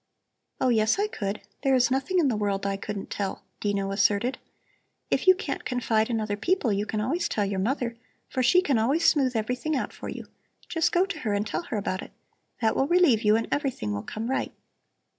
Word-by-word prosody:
"Oh, 260 - +2
yes, 220 - +3
I 410 - +2
could. 205 - -4 0.2
There 270 -1 +3
is 250 -1 +3
nothing 270 +8 0
in 330 -5 +4
the 245 - +1
world 200 -2 -1
I 200 0 0
couldn't 200 0 -6
tell," 195 -2 -3 0.2
Dino 200 -1 -1
asserted. 205 +6 +1 0.7
"If - - +1
you 370 - +9
can't 410 - -4
confide 225 -3 0
in 230 -2 0
other 210 -1 -2
people, 245 - +1
you 205 +2 -1
can 215 - -2
always 275 +12 0
tell 205 - 0
your 195 -1 -2
mother, 235 +3 -1 0.3
for 260 - -2
she 355 +9 +5
can 275 -9 +2
always 275 +9 +2
smooth 260 -4 +3
everything 250 +7 -1
out 265 - -2
for - - -7
you. - - -6 0.4
Just 325 -2 +1
go 355 +2 +3
to 385 -5 -5
her 215 -8 -1
and 205 +1 0
tell 215 - -2
her 225 - -3
about 195 -1 -2
it. - - -11 0.5
That 220 -1 +2
will 270 - +2
relieve 340 -10 +4
you 210 -1 +4
and 225 - 0
everything 260 - -1
will 100 - -3
come 220 - -5
right." 265 - -1
230 Hz, 215 wpm, -26 LUFS, 205-275 Hz, 0.7 s, you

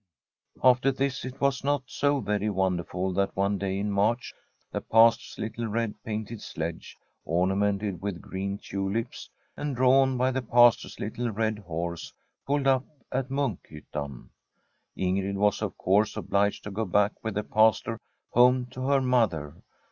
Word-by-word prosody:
After 130 +1 +5
this 135 0 -2
it 130 0 -7
was 140 -2 +1
not 145 -1 +1
so 145 +2 0
very 105 0 -1
wonderful 95 -1 -1
that 100 +1 0
one 100 +1 0
day 95 -1 -2
in 105 +1 -1
March 105 +5 0 0.4
the - - -3
Pastors 115 +1 +4
little 115 +1 -4
red 110 0 -1
painted 110 0 -5
sledge, 80 0 -6 0.3
ornamented 95 +2 0
with 100 -3 -3
green 100 +2 -4
tulips, 100 +3 -4 0.3
and 145 -2 -3
drawn 130 +1 +4
by 130 +1 +2
the 130 +1 -1
Pastor's 120 0 +4
little 120 +3 -3
red 110 0 -1
horse, 85 -2 -5 0.4
pulled 140 0 +1
up 130 -1 +3 0.3
at 130 0 -1
Munkhyttan. 75 - -4 0.7
Ingrid 95 +1 0
was 105 0 +2
of - - -3
course 100 +3 +2
obliged 100 0 0
to 105 - -6
go 110 +3 -2
back 100 +2 +2
with 110 -3 -3
the 105 - -1
Pastor 110 +1 +2 0.3
home 125 +1 +5
to 130 +1 -4
her 140 -1 +3
mother. 105 - +1
105 Hz, 150 wpm, -27 LUFS, 95-125 Hz, 0.7 s, After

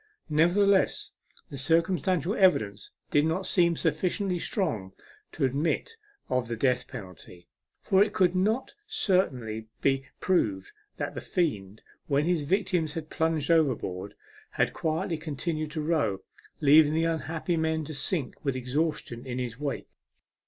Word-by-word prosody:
Nevertheless, 185 +6 +3 0.4
the 140 - -6
circumstantial 170 +3 +1
evidence 110 - +2 0.2
did 145 - +4
not 165 +5 0
seem 170 -2 +3
sufficiently 180 +4 0
strong 140 - -2 0.4
to - - +1
admit 155 - -1 0.3
of 125 -2 0
the 115 - -3
death 125 +2 +1
penalty, 90 -5 -10 0.4
for 195 +1 +5
it 210 - -2
could 185 -3 +2
not 215 +8 0
certainly 130 - 0
be 135 -1 +1
proved 105 - 0 0.3
that - - -3
the - - -5
fiend, 105 - -2 0.2
when 145 +1 +2
his 175 -2 +1
victims 175 -1 0
had 160 -2 -6
plunged 160 -1 0
overboard, 110 - +1 0.3
had - - 0
quietly 160 +1 -1
continued 155 0 -3
to 155 +1 -4
row, 150 - +1 0.4
leaving 150 +1 +6
the 165 - +2
unhappy 165 +1 -1
men 160 -1 0
to 155 - -6
sink 140 0 -1
with 140 -3 0
exhaustion 130 -1 -2
in 125 -1 -3
his 125 -1 -4
wake. 145 -2 -4
155 Hz, 140 wpm, -28 LUFS, 130-175 Hz, 0.4 s, leaving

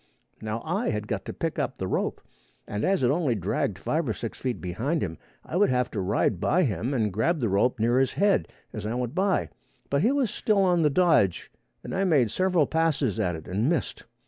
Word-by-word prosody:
Now 110 +1 -4
I 195 +9 -1
had 105 -1 -3
got - - -3
to - - -4
pick - - -3
up - - -2
the - - -3
rope, - - -1 0.5
and 105 +1 -3
as 190 -7 +2
it 125 - +4
only 145 -6 +1
dragged 95 0 -1
five 155 +7 -1
or - - +1
six 115 - -7
feet 125 -2 -2
behind 115 - -2
him, 80 -5 -5 0.3
I - - -6
would 200 +3 +4
have 125 -1 0
to 105 - -2
ride 95 0 +1
by 180 - +2
him 120 - -1
and 110 -7 0
grab 155 - +1
the 115 -5 0
rope 110 +6 +2
near 120 +3 +3
his 135 - +1
head 200 0 +2 0.3
as 110 - -5
I 115 - -2
went 125 -1 -2
by: 190 0 +1 0.4
but 140 0 +2
he 235 - +3
was 275 -6 +1
still 205 -3 +1
on 175 -2 +3
the 150 - +4
dodge, 145 - +2 0.3
and - - -6
I 190 +1 +1
made 145 - +3
several 185 -2 +2
passes 155 - 0
at 90 -2 0
it 80 - -9
and 105 - 0
missed. 165 -8 -2
130 Hz, 225 wpm, -26 LUFS, 105-170 Hz, 0.5 s, it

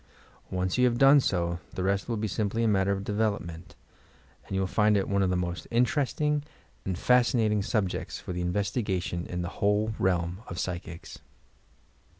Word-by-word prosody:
Once 95 +4 -1
you 125 - +5
have 120 -1 +2
done 135 +2 +7
so, 85 -7 0 0.2
the 90 - -2
rest 100 +3 0
will 115 - 0
be 110 +1 -1
simply 110 +3 -1
a - - +3
matter 100 -2 +2
of 100 0 -1
development; 100 -5 -2 0.7
and 95 - -4
you - - +1
will 95 - +1
find 105 +2 +3
it 95 - 0
one 100 0 +1
of 95 - +2
the 90 - +1
moat 90 0 -3
in 120 +1 +4
teresting 150 +3 0 0.4
and 95 -2 -2
fascinating 115 -3 +3
subjects 100 -2 -2
for 90 - -6
investigation 90 0 -1
in 90 0 -3
the 85 - -3
whole 105 +2 +2
realm 90 +1 0
of 85 - -6
psychics. 85 -2 -5
100 Hz, 175 wpm, -28 LUFS, 90-110 Hz, 0.7 s, done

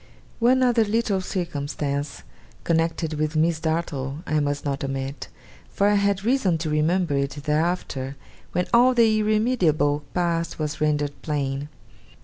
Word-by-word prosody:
One 255 +2 +4
other 240 -2 +4
little 215 -2 0
circumstance 145 -5 -3 0.4
connected 165 -1 0
with 155 +1 -1
Miss 160 +1 +2
Dartle 155 -3 -2
I 155 - +1
must 145 0 -2
not 140 -1 -2
omit; 135 +1 -4 0.4
for 200 - +2
I 205 - +4
had 200 -1 +1
reason 225 -9 +2
to 160 -1 -3
remember 160 +2 +1
it 140 +1 -1
thereafter, 150 -4 -1 0.4
when 180 0 0
all 250 +2 +6
the 225 -2 +4
irremediable 190 - +2
past 170 -2 0
was 150 -1 -3
rendered 145 -1 +1
plain. 140 -1 -2
160 Hz, 135 wpm, -24 LUFS, 145-200 Hz, 0.4 s, all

